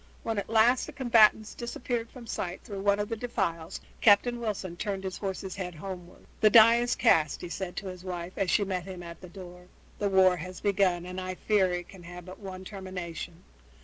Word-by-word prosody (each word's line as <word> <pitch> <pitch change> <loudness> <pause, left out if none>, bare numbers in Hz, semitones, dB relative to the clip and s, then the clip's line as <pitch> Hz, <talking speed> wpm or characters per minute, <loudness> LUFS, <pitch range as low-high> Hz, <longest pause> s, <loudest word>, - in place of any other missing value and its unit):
When 225 -2 -1
at - - -6
last 230 +3 +4
the 310 - -9
combatants 225 -5 +4
disappeared 235 -1 -4
from 250 -3 -11
sight 180 -5 -4
through 200 -2 -6
one 200 0 +3
of 205 - -1
the 230 - -3
defiles 170 -7 -3 0.2
Captain 235 +3 +5
Wilson 200 -6 -3
turned 195 +1 -3
his 190 -1 -5
horse's 190 -1 -4
head 180 -3 -5
homeward. 180 +1 -9
"The 215 - +6
die 230 +2 +8
is 240 +1 +1
cast," 155 -2 +3
he 175 - -6
said 180 0 -5
to 195 - -5
his 185 -1 -7
wife 180 -1 -5
as 195 -2 0
she 205 - +3
met 185 -3 -3
him 185 -2 -8
at 170 -1 -10
the 180 - -10
door. 180 -1 -11 0.3
"The 205 - +1
war 190 -1 +5
has 180 +3 -7
begun, 190 -4 +1
and 180 +1 -5
I 185 0 -4
fear 195 -2 +2
it 175 -1 -3
can 190 - -13
have 175 0 -10
but 185 0 -10
one 190 -2 -8
termination. 180 -3 -7
190 Hz, 215 wpm, -29 LUFS, 180-215 Hz, 0.3 s, die